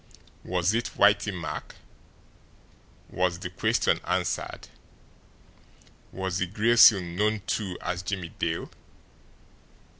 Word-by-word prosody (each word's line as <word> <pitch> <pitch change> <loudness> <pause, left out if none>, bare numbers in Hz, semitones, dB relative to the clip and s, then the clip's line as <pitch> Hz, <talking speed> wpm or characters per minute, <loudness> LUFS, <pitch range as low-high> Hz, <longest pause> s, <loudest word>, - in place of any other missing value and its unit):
Was 90 +2 0
it 115 +1 -1
Whitey - - +4
Mack? - - -6 1.3
Was 90 -2 -1
the 90 0 -7
question 90 - +1
answered? - - -2 1.4
Was 95 -2 -3
the 90 - 0
Gray 110 +5 +1
Seal 110 -4 +8
known, 100 +5 -1
too, 95 -5 -2
as 90 - -3
Jimmie 90 -2 -4
Dale? 80 +1 -3
90 Hz, 100 wpm, -26 LUFS, 90-105 Hz, 1.4 s, Seal